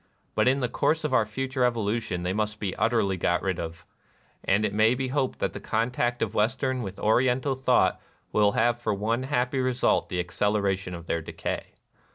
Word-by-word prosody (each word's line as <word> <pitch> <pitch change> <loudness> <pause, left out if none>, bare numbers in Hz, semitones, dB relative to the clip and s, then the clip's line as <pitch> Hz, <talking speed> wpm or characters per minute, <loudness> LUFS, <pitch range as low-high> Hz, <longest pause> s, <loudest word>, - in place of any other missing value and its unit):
But - - +2
in 135 +2 +3
the 125 - +1
course 160 +6 0
of 150 -3 -1
our 110 -4 +3
future 130 +3 -2
evolution 115 -5 0
they 90 +1 -1
must 105 +1 -2
be 100 -3 -3
utterly 110 -5 +1
got 85 0 0
rid 95 -3 -1
of; 85 0 -6 0.6
and 100 +2 +2
it 100 - -2
may 110 +3 +4
be 130 0 -2
hoped 135 -1 -1
that - - -2
the - - -6
contact 120 +2 0
of 110 - -3
Western 130 +4 0
with 95 -3 -6
Oriental 125 +5 +2
thought 130 0 +2 0.3
will 105 -1 +3
have 120 +1 +2
for 110 -3 -1
one 110 +5 -1
happy 130 -1 0
result 130 0 +1
the 90 - -2
acceleration 95 0 0
of 85 -1 -9
their 85 0 -1
decay. - - -5
110 Hz, 195 wpm, -26 LUFS, 100-125 Hz, 0.6 s, may